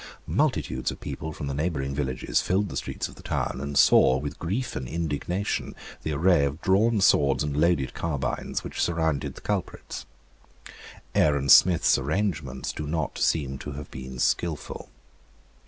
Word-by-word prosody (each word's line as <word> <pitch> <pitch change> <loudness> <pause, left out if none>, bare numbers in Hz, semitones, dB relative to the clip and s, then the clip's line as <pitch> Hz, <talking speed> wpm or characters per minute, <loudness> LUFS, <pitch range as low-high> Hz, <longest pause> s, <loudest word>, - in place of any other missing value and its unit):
Multitudes - - 0
of - - -6
people 80 - -5
from 75 - -6
the 70 - -3
neighbouring 70 -2 -2
villages 65 -3 -1
filled 100 +2 0
the - - -7
streets - - -3
of - - -13
the - - -14
town, 60 +1 -2
and 70 0 -3
saw 65 -1 +6
with 70 +1 -5
grief 105 +10 -2
and 65 -1 -4
indignation 85 +6 -2 0.3
the 80 - -3
array 80 +1 +3
of 70 +2 -1
drawn 105 +4 +3
swords 70 -8 +4
and 75 -1 -2
loaded 75 -4 +2
carbines 70 -6 -3
which - - -4
surrounded 80 -5 0
the - - -11
culprits. - - -4 1.1
Aaron 70 -2 +2
Smith's 85 -4 +6
arrangements 75 -3 -2
do 75 - -5
not 80 -1 -2
seem 70 -4 0
to 75 - -6
have 75 +1 -8
been 65 0 -7
skilful. 80 +4 -1
75 Hz, 155 wpm, -26 LUFS, 70-85 Hz, 1.1 s, saw